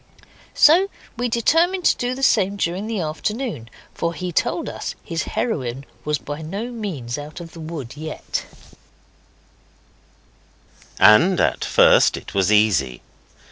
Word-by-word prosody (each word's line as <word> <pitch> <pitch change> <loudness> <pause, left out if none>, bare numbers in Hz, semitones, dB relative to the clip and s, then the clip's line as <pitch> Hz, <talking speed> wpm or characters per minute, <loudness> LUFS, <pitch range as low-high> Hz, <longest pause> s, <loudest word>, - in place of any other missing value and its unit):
So 355 +6 +6 0.3
we 245 +1 -2
determined 330 - +2
to - - +5
do 245 +1 -2
the 270 - -6
same 195 -6 +3
during 190 +2 -2
the 220 -4 -2
afternoon, 160 - -4 0.2
for 170 0 -2
he 180 -1 -4
told - - -1
us - - -5
his 165 -1 -3
heroine 135 - -2 0.2
was 150 0 0
by 145 +2 -7
no 200 +10 -5
means 160 - -5
out 150 +3 -9
of 170 -1 -9
the 165 - -12
wood 155 -6 -7
yet. 155 +1 -5 2.5
And 170 - +6
at - - +1
first - - +5
it - - -10
was 95 0 +2
easy. 95 - +2
170 Hz, 140 wpm, -21 LUFS, 145-225 Hz, 2.5 s, So